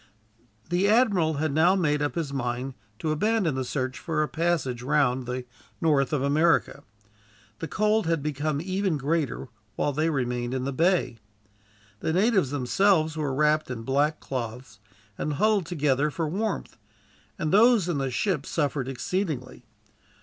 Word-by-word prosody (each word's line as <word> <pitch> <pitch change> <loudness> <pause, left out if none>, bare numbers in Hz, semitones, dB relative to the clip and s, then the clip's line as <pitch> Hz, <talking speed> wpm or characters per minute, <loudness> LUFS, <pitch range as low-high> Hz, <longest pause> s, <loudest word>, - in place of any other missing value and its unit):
The 185 +3 +2
admiral 200 -9 +3
had 155 +1 -1
now 170 +5 +4
made 150 -6 +1
up 145 - -1
his 155 -5 -3
mind 125 0 -3 0.2
to 155 - -2
abandon 200 +1 +1
the 130 0 -2
search 130 0 -3
for 155 -2 -1
a - - -1
passage 160 -8 -1
round 130 -2 +1
the 125 0 -4 0.3
north 145 -5 +2
of 145 -3 0
America. 155 +4 +2 0.8
The 165 - -4
cold 215 0 +1
had 165 -4 0
become 150 0 -1
even 185 -1 -1
greater, 145 -2 -2 0.3
while 145 - 0
they 155 +3 +1
remained 125 -3 -2
in 130 - -2
the 135 +1 -2
bay. 170 -5 +1 0.8
The 160 - -1
natives 190 - +3
themselves 155 +4 +2
were 150 -3 -2
wrapped 150 +1 +2
in 115 -3 -5
black 145 +5 +1
cloths, 120 -4 -6 0.4
and 150 - -1
huddled 205 +2 +2
together 150 -4 +1
for 160 +2 -2
warmth; 210 +8 -3 0.6
and 155 -1 -2
those 220 -2 +5
in 165 -5 -1
the 135 -1 -1
ship 150 - -1
suffered 145 -4 -1
exceedingly. 135 -2 -3
150 Hz, 155 wpm, -26 LUFS, 135-175 Hz, 0.8 s, those